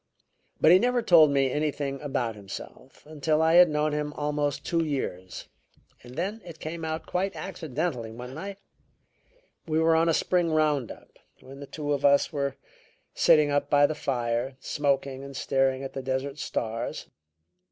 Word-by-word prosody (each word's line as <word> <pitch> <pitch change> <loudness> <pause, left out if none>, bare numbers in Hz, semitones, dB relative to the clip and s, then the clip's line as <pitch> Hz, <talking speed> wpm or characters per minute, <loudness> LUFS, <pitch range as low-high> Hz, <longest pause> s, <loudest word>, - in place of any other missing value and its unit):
But 155 - +6
he 180 - +8
never 245 +1 +1
told 160 -6 +7
me 135 -2 +2
anything 145 -2 -2
about 130 -6 -2
himself 105 +6 -10
until 155 0 0
I 160 +1 +3
had 175 0 +8
known 150 0 0
him 150 0 -2
almost 145 -1 -2
two 165 -1 +1
years, 95 - -4 0.5
and 125 +1 -13
then 200 +7 -3
it 170 -2 -11
came 160 +1 -6
out 160 0 -3
quite 195 +2 -2
accidentally 155 -8 -4
one 125 +3 -8
night 195 +6 -7 1.1
we 155 -1 0
were 160 0 +4
on 165 +1 +3
a - - +3
spring 175 -2 +1
round 150 -6 +1
up - - -15 0.2
when 135 +1 -12
the 140 - -9
two 145 0 -3
of 140 - -2
us 140 +3 +4
were 140 -2 -2 0.6
sitting 150 -1 +4
up 145 0 0
by 145 0 +5
the 155 - 0
fire, 125 -2 -2
smoking 140 -2 -1
and 140 -1 -8
staring 135 0 +1
at 135 - -6
the 135 - -4
desert 135 +2 -3
stars. 115 0 -3
145 Hz, 170 wpm, -27 LUFS, 135-160 Hz, 1.1 s, he